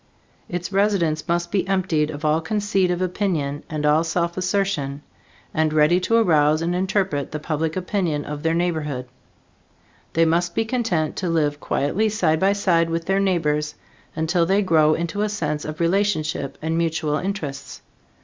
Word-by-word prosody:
Its 180 +2 -4
residents 190 -6 +1
must 170 0 -1
be 195 -2 0
emptied 180 -6 +1
of 150 0 -6
all 155 +1 +2
conceit 200 0 0
of 180 +1 0
opinion 170 -7 -1
and 155 -2 -2
all 150 +2 +4
self 170 +1 -1
assertion, 185 -7 -1 0.5
and 155 0 +1
ready 155 +3 +4
to 185 +5 +1
arouse 155 -7 +3
and 170 +1 0
interpret 185 -6 0
the 150 - -3
public 155 +1 -2
opinion 180 -5 -1
of 150 0 -5
their 165 +1 +1
neighborhood. 155 -7 -2 1.1
They 165 0 +4
must 170 +2 +1
be 225 - +1
content 220 -10 -1
to 185 - -1
live 150 -3 +1
quietly 185 +13 0
side 165 -7 +1
by 195 +3 +3
side 170 -5 +2
with 165 0 -2
their 195 +2 +1
neighbors, 150 -6 0 0.4
until 165 +2 +1
they 195 +3 +3
grow 155 -4 +4
into 170 +4 -3
a 210 - +1
sense 150 -7 -2
of 155 +1 -6
relationship 165 -6 0
and 160 +1 -1
mutual 160 -2 0
interests. 165 -7 -5
165 Hz, 165 wpm, -22 LUFS, 155-190 Hz, 1.1 s, all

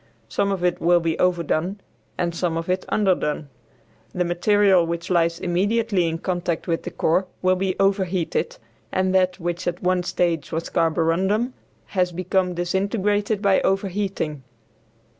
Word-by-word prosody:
Some 200 0 0
of 190 -2 -2
it 180 -1 +1
will 175 +1 +4
be 165 -1 -1
"overdone" 180 +1 0 0.4
and 170 -1 -1
some 170 -1 -1
of 165 +2 -4
it 185 +1 -1
"underdone." 175 -7 0 0.7
The 180 -1 +1
material 190 +1 +3
which 170 +1 -4
lies 170 -1 +2
immediately 195 +1 +1
in 165 0 -2
contact 175 -1 -2
with 165 -1 0
the - - -5
core 185 +4 +1 0.2
will 185 0 +4
be 185 0 -1
overheated, 195 - 0 0.3
and 185 0 +1
that, 185 0 +2
which 175 +1 -3
at 175 +1 -3
one 180 0 +2
stage 170 -3 -1
was 165 0 -3
carborundum, 180 +9 +1 0.4
has 180 -2 +1
become 180 +1 0
disintegrated 200 +3 0
by 195 -1 +4
overheating. 195 -6 -1
180 Hz, 145 wpm, -23 LUFS, 170-195 Hz, 0.7 s, will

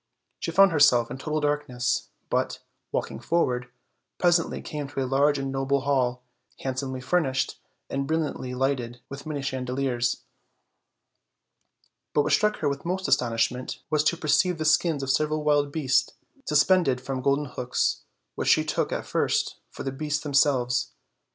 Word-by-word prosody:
She - - -3
found 195 -1 +6
herself 125 -6 +4
in 130 - -6
total 155 +2 -2
darkness; 145 -4 -1 0.2
but, - - 0 0.3
walking - - -3
forward, 125 -7 0 0.5
presently 175 -2 +2
came 150 -2 -5
to 140 - -6
a - - -2
large 140 +3 +3
and 135 0 -3
noble 135 +1 0
hall, 125 -3 0 0.4
handsomely 130 0 -3
furnished 135 -3 0 0.3
and 135 0 -2
brilliantly 150 -5 -2
lighted 125 -2 -1
with 140 +2 -8
many 145 -3 -3
chandeliers; 130 -2 -1 1.9
but 145 - +4
what - - +1
struck 210 0 +3
her - - +1
with 140 -1 -2
most 185 +2 -2
astonishment 125 +1 0
was 155 -1 +3
to 170 - +2
per 155 - -6
ceive 180 +4 +3
the 155 - -3
skins 155 -2 +3
of 135 - 0
several 155 +2 +1
wild 145 -1 +2
beasts 135 -3 +1 0.3
suspended 150 -3 +3
from 130 0 -4
golden 140 +2 +1
hooks, 125 -2 -1 0.3
which - - -1
she - - +4
took - - -1
at - - -3
first - - 0
for - - -8
the 135 - -2
beasts 150 +2 -2
them 145 -2 -5
selves. 125 -3 +2
140 Hz, 155 wpm, -26 LUFS, 130-150 Hz, 1.9 s, found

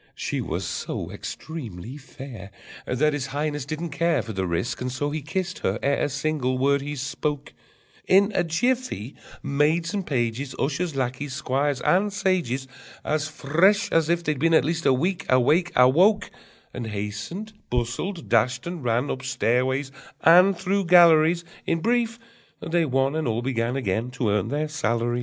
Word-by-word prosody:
She - - -3
was - - -3
so - - -4
extremely 120 - -7
fair 130 -8 -10 0.4
That 150 +4 +1
His 140 -2 -2
Highness 145 0 -2
didn't 155 +3 -4
care 160 -3 +1
For 110 - -6
the 95 -1 -2
risk, 85 +9 -2
and 125 0 -2
so 145 +3 -2
he 155 +1 -3
kissed 180 +5 -3
her 95 +3 -1
ere 140 0 +2
a - - -2
single 135 -3 -1
word 140 +2 +2
he 145 +1 -5
spoke: 145 +1 -3 0.5
In 200 +2 +5
a 175 - +2
jiffy 205 - -1 0.3
maids 155 +5 +1
and 200 -2 -1
pages, 130 -1 -2
Ushers, 155 +2 -1
lackeys, 130 +1 -3
squires, 140 -1 -1
and 200 +3 +2
sages, 180 -10 -1 0.4
As 155 0 0
fresh 170 +9 +2
as 165 -1 +2
if 170 0 +1
they'd 150 -4 -1
been 165 0 +3
at 140 - +4
least 165 +1 -1
A - - +6
week 175 +8 -1
awake, 145 +8 +3
Awoke, 175 - +4 0.4
And 120 -3 -5
hastened, 105 - -5 0.2
bustled, 125 - -2
dashed 125 -1 +2
and 170 -4 -5
ran 120 +3 0
Up 130 - -4
stairways 130 +1 0 0.3
and 180 +3 +6
through 195 +2 0
galleries: 170 -1 +6 0.2
In 165 - +1
brief, 230 +3 0 0.4
they 170 0 0
one 135 +1 +1
and 160 -3 -1
all 115 +1 -1
began 120 -1 -1
Again 115 -1 -1
to 120 -5 +1
earn 105 0 +1
their 150 +5 -1
salaries! 120 -5 -1
145 Hz, 165 wpm, -24 LUFS, 125-170 Hz, 0.5 s, A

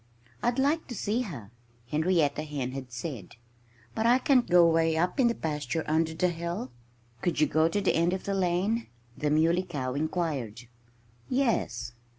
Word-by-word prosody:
"I'd 240 +1 +1
like 290 +4 +1
to 245 - -6
see 215 +4 -1
her," 135 - -7 0.4
Henrietta 155 -2 +2
Hen 145 -4 -4
had 130 -1 -7
said. 120 - -6 0.6
"But 220 - 0
I 245 +2 +6
can't 260 -2 +3
go 175 -1 +7
way 165 -1 +2
up 180 - 0
in 255 - +5
the 235 - +1
pasture, 150 -1 -2
under 160 +1 +1
the 180 +2 +2
hill." 170 -6 -4 0.5
"Could 175 - 0
you 155 - +5
go 155 +2 +2
to 185 +5 0
the 200 - +2
end 170 +2 +2
of 190 0 -3
the 200 - -2
lane?" 195 +5 0 0.3
the 150 - -1
Muley 165 +4 +3
Cow 145 -9 -4
inquired. 145 - -2 0.7
"Yes!" 230 - 0
165 Hz, 170 wpm, -28 LUFS, 150-195 Hz, 0.7 s, go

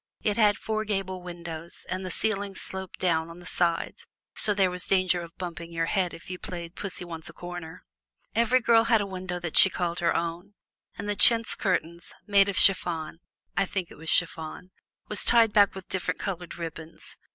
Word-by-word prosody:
It 210 -2 +1
had 210 -3 +4
four 215 0 -2
gable 195 -3 -3
windows, 170 -2 -7
and 185 +1 -3
the 185 - -4
ceiling 200 +1 -2
sloped 190 -1 -6
down 165 -2 +1
on 165 +1 -11
the 175 - -13
sides, 170 -2 -1 0.3
so 215 - +4
there 190 -2 +3
was 180 0 -3
danger 185 -2 +2
of 170 -1 -11
bumping 170 -2 -6
your 165 0 0
head 185 0 0
if 170 - -12
you 180 0 -6
played 170 -4 -6
pussy 190 -3 -6
wants 165 -2 -8
a - - -11
corner. 175 -2 -8 0.5
Each 235 +2 +3
girl 230 -1 +5
had 230 -1 +4
a - - -1
window 185 -2 -5
that 175 -2 -5
she 190 - +10
called 175 -2 -2
her 170 - +1
own, 170 +4 -3 0.4
and 200 - -5
the 205 - 0
chintz 225 +4 +5
curtains, 170 -3 -2
made 200 -1 +4
of 195 - -3
chiffon 165 -4 +3 0.4
(I 195 - +2
think 185 -3 -3
it - - -12
was 160 0 -5
chiffon), 170 +1 +1 0.4
were 210 - -4
tied 225 0 +4
back 205 -2 +5
with 190 -2 -9
different 185 - -2
colored 180 -4 -5
ribbons. 165 -1 -8
180 Hz, 195 wpm, -27 LUFS, 170-200 Hz, 0.5 s, she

